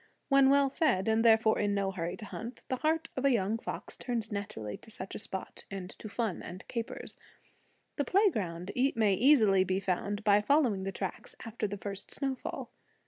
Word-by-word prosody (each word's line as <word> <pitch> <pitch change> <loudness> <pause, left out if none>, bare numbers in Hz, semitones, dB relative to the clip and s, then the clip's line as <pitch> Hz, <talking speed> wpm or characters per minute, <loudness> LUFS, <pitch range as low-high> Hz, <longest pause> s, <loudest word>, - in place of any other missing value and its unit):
When 275 -1 +6
well 280 0 +5
fed, 265 - +2
and 220 0 +3
therefore 220 -1 +5
in 205 -1 +1
no 195 -1 0
hurry 170 -2 -4
to 220 - -8
hunt, 230 +4 -7
the 260 - 0
heart 320 +3 0
of 260 - -2
a 275 - +5
young 225 -2 +1
fox - - -6
turns 235 -4 -3
naturally 110 - -4
to - - -15
such 190 -3 -8
a - - -5
spot, 190 -2 -6
and 190 -2 -6
to 215 - -9
fun 220 -3 -2
and 180 +2 -9
capers. 230 -2 -4 0.8
The 285 - +1
playground 200 - +1 0.2
may 215 -3 +3
easily 215 -4 +5
be 185 +1 0
found 200 +2 -2
by 205 0 +5
following 225 -6 +2
the 195 - -2
tracks 190 -1 -5
after 225 -1 -3
the 205 0 -5
first 200 0 -6
snowfall. 270 -2 -4
215 Hz, 190 wpm, -31 LUFS, 195-250 Hz, 0.8 s, When